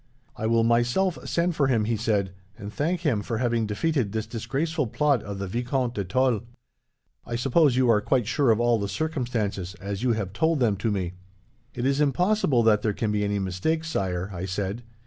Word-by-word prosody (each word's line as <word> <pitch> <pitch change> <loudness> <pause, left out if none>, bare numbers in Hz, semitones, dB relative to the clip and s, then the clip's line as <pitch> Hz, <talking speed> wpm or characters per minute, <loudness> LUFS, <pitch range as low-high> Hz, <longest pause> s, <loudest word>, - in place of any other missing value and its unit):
"'I 110 - -2
will 115 0 +3
myself 120 +11 +2
send 170 0 +1
for 140 -3 +2
him,' 115 -5 +2
he 115 +1 0
said, 105 -3 0 0.3
'and 100 +1 -8
thank 170 +7 -1
him 135 - +1
for 115 +2 -3
having 115 -2 0
defeated 125 +1 0
this 110 0 -2
disgraceful 145 +5 -2
plot 140 +1 +1
of 100 -1 -6
the 100 - -3
Vicomte 120 +4 -1
de 100 - -2
Tulle. 120 +4 +1 0.8
I 120 - -5
suppose 135 +3 +3
you 130 -1 +3
are 110 -3 +4
quite 125 +1 +1
sure 130 +3 +1
of 110 -1 +4
all 120 -1 +3
the 100 -1 -3
circumstances, 120 - -2
as 100 0 -4
you 125 -2 +2
have 100 -4 -3
told 160 +6 +1
them 115 -5 +2
to 110 - -1
me?' 95 -4 -2 0.6
"'It 120 - -2
is 140 +2 +2
impossible 150 - +2
that 105 -2 +4
there 105 -1 0
can 105 +1 -1
be 105 0 0
any 100 0 0
mistake, 100 - -1
Sire,' 95 - -2
I 90 +1 -4
said. 100 +4 -3
115 Hz, 205 wpm, -25 LUFS, 105-135 Hz, 0.8 s, are